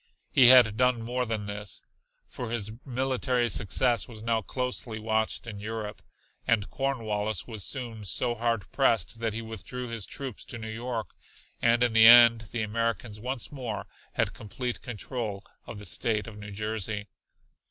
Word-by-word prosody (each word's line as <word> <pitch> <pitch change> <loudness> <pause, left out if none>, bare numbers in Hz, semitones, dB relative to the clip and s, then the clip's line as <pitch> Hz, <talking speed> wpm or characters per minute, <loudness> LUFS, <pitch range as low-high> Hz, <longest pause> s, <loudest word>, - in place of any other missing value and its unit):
He 125 - +7
had 120 -4 +8
done 125 -2 +2
more 125 +1 -1
than 110 -2 -2
this, 100 0 -5 0.4
for 120 - -6
his 110 -3 -1
military 130 -1 0
success 110 +7 +2
was 110 -3 -11
now 115 -1 +1
closely 125 0 -3
watched 110 +1 -1
in 105 -3 -7
Europe. 105 0 -5 0.5
And 105 -3 +2
Cornwallis 110 -7 -1
was 110 -5 -5
soon 120 -5 -2
so 120 +5 0
hard 115 -2 -1
pressed 115 -4 +1
that 115 -2 -1
he 115 - -3
withdrew 115 +3 -6
his 115 -4 -4
troops 135 -5 -6
to - - -7
New 110 -1 -6
York 115 -4 -4 0.5
and 120 +1 +4
in 120 -2 +2
the 110 0 +8
end 115 -2 +8
the 115 -2 -2
Americans 115 0 -2
once 125 +1 -3
more 125 -7 -5 0.3
had - - 0
complete 120 +3 -5
control 110 -3 -4 0.2
of 115 - -7
the 105 - -8
state 105 +3 0
of 115 - -9
New 105 0 -9
Jersey. 105 0 -3
115 Hz, 165 wpm, -28 LUFS, 105-120 Hz, 0.5 s, had